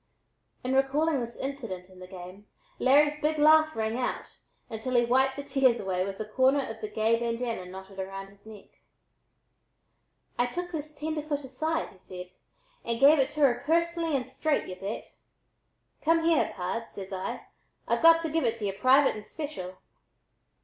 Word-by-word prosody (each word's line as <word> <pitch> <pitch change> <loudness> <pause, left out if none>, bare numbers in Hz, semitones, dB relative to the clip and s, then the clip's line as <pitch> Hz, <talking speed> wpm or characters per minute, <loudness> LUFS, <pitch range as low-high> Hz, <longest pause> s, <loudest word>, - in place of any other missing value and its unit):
In 255 +1 -1
recalling 280 +3 +2
this 235 -1 -5
incident 230 -10 -5
in 185 -1 -17
the 185 - -10
game, 185 +2 -11 0.3
Larry's 295 +3 +4
big 310 +1 +1
laugh 315 +1 +5
rang 220 +2 -1
out 250 - -4 0.3
until 235 +3 -4
he 240 0 +5
wiped 265 +2 +3
the 285 - -5
tears 270 -3 +3
away 185 -2 -1
with 195 0 -5
a 215 - -3
corner 265 +5 +2
of 225 0 -8
the 215 - -4
gay 220 +2 +1
bandanna 230 -4 -2
knotted 190 +1 -10
about 195 +1 -6
his 200 0 -22
neck. 215 -2 -14 1.6
"I 245 - +3
took 355 +7 -5
this 305 -2 -6
tenderfoot 300 -1 -3
aside," 310 +5 -2
he 190 - -19
said, 180 0 -10 0.5
"and 235 0 -1
gave 285 +3 +7
it 270 0 +3
to 305 - -3
her 255 -4 +4
personally 335 0 +1
and 250 - -5
straight, 310 -2 -1
y'u 185 - -6
bet. 200 +4 -6 0.8
Come 330 +1 +3
here, 330 -2 +3
pard, 190 +5 -3
says 195 0 -8
I, 190 0 -4 0.4
I've - - +1
got 330 0 +7
to 320 - -2
give 325 +1 +1
it 230 -2 +1
to 215 - -4
y'u 195 - -1
private 260 +6 +4
and 215 - -7
special. 210 - -7
250 Hz, 175 wpm, -28 LUFS, 200-295 Hz, 1.6 s, gave